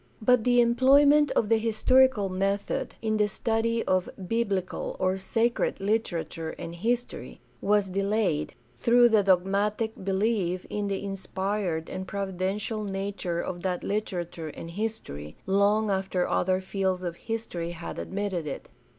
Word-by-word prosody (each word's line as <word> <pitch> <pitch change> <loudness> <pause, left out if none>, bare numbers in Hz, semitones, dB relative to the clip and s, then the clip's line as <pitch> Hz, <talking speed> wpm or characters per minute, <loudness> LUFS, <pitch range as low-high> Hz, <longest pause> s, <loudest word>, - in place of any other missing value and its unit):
But 245 0 +3
the 245 -1 +5
employment 280 +5 +5
of 215 - +2
the 225 -1 +4
historical 230 0 +3
method 195 +2 -1
in 215 -1 +1
the 210 -1 +3
study 230 +2 0
of 185 -1 +1 0.2
biblical 200 -5 -1
or 185 +1 0
"sacred" 230 +5 0
literature 185 -6 -2
and 170 - -6
history 230 - -3 0.2
was 205 -1 +2
delayed, 195 -4 0 0.2
through 240 - +5
the 220 -2 +5
dogmatic 200 +4 +1
belief 190 -2 0
in 205 -1 -1
the 195 0 -2
inspired 195 -3 -2
and 185 0 -5
providential 195 +3 -2
nature 195 -3 -3
of 175 -1 -5
that 180 -1 -2
literature 175 -5 -3
and 165 +2 -8
history, 170 - -5
long 205 +2 +3
after 190 -2 0
other 185 +1 +1
fields 190 -1 -1
of 175 -2 -3
history 225 -7 -4
had 170 0 -6
admitted 190 -5 -3
it. 140 - -6
200 Hz, 135 wpm, -27 LUFS, 185-220 Hz, 0.2 s, the